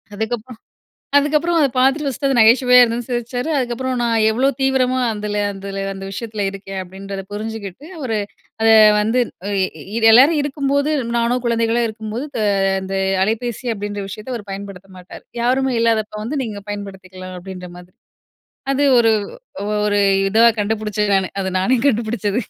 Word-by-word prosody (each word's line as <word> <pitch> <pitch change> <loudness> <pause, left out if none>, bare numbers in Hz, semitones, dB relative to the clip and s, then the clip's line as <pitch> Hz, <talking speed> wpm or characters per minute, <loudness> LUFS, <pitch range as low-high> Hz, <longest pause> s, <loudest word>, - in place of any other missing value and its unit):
அதுக்கப்புறம் 225 +2 -5 0.6
அதுக்கப்றம் 300 +4 +2
அத 290 - +4
பாத்துட்டு 270 +4 +2
ஃபர்ஸ்ட்டு 275 +1 -2
அது 270 - +1
நகைச்சுவையா 250 +3 +6
இருந்ததுன்னு 235 0 +1
சிரிச்சாரு, 245 +3 -3
அதுக்கப்றம் 255 0 -2
நான் 230 -2 +1
எவ்ளோ 245 +5 +1
தீவிரமா 260 -1 +1
அதுல 210 -1 -3
அதுல 195 0 -6
அந்த 195 0 -8
விஷயத்துல 215 0 -4
இருக்கேன் 195 0 -7
அப்டின்றத 195 +1 -7
புரிஞ்சுகிட்டு, 215 +2 -6 0.2
ஒரு 230 -4 -1 0.5
அத 225 - +4 0.3
வந்து 225 +4 +1 0.4
எ 190 +3 -3
எல்லாரும் 275 +7 +6
இருக்கும்போது, 285 +1 0 0.3
நானோ 235 +1 +1
குழந்தைகளோ 230 0 +1
இருக்கும்போது 220 +3 -5 0.2
அ - - +2 0.3
அந்த 190 0 -4 0.3
அலைபேசி 230 +3 -3
அப்டின்ற 205 -1 -5
விஷயத்த 215 +6 -7
அவரு 210 -4 -7
பயன்படுத்த 195 -1 -9
மாட்டாரு. 180 - -12 0.2
யாருமே 260 +1 +1
இல்லாதப்போ 220 -2 0
வந்து 280 +6 -3
நீங்க 210 -3 -7
பயன்படுத்திக்கலாம் 190 -2 -8
அப்டின்ற 180 0 -9
மாதிரி 180 0 -16 0.8
அது 275 +1 +1 0.2
ஒரு 230 -1 +4 0.8
ஒரு 205 -1 +1 0.3
இதுவா 225 +3 +5
கண்டுபிடிச்சேன் 210 -1 -1
நானு. 190 -1 0
அது 190 - -2
நானே 250 +8 +2
கண்டுபிடிச்சது. 220 -2 -1
220 Hz, 140 wpm, -19 LUFS, 200-250 Hz, 0.8 s, நகைச்சுவையா